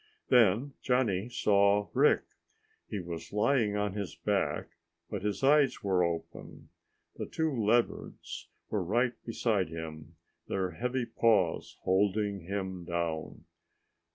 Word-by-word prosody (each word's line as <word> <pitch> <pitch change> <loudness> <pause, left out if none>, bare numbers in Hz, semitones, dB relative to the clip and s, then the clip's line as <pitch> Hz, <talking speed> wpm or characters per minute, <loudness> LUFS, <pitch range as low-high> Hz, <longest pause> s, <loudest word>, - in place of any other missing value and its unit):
Then 120 +3 +4
Johnny 120 -5 +1
saw 100 -3 +3
Rick. - - +4 0.6
He 105 - -4
was 85 -2 -7
lying 110 0 +2
on 105 -1 -1
his 100 -2 -4
back, - - -1 0.4
but 100 -3 -3
his 105 +3 -2
eyes 145 -3 +4
were 95 -3 +2
open. 85 -1 -5 0.5
The - - -4
two 160 -3 -1
leopards 115 +1 -1 0.2
were 105 - 0
right 120 +7 +1
beside 110 -6 0
him, 80 -2 -8 0.3
their 95 -2 -1
heavy 125 +1 -2
paws 105 -9 +1
holding 100 +1 +1
him 95 -1 -4
down. 85 -2 -3
100 Hz, 120 wpm, -30 LUFS, 95-115 Hz, 0.6 s, Then